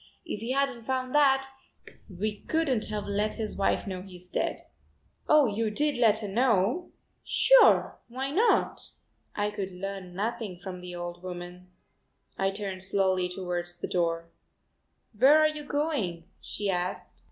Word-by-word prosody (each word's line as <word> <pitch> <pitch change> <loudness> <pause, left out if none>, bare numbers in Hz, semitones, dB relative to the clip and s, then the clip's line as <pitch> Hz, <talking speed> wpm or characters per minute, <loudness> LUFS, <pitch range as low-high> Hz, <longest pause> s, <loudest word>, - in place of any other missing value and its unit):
If 220 -11 -5
we 230 - -5
hadn't 265 -2 0
found 255 +2 -2
that, 270 -2 +4 0.6
we 205 +3 -3
couldn't 280 -9 +1
have 210 -1 -4
let 205 +1 -1
his 220 -2 -3
wife 195 - +1
know 185 -2 -4
he's 180 -1 -11
dead." - - -1 0.7
"Oh, 300 -1 +7
you 220 0 0
did 290 +6 0
let 220 -3 +5
her - - -3
know?" 230 - +1 0.3
"Sure, - - +5
why 265 +3 -4
not?" 425 +10 +2 0.5
I 205 0 0
could 195 -2 -4
learn 185 -1 -6
nothing 215 -2 -3
from 180 0 -8
the 180 0 -7
old 175 0 -6
woman. 180 0 -8 0.7
I 195 - +1
turned 195 -1 -4
slowly 190 -1 +2
towards 175 -1 -4
the 175 - -5
door. 170 -1 -1 0.8
"Where 265 +8 +7
are 310 0 +5
you 305 -1 -5
going?" 285 - -1 0.2
she 205 - -4
asked. 180 -1 -3
205 Hz, 150 wpm, -28 LUFS, 180-260 Hz, 0.8 s, Oh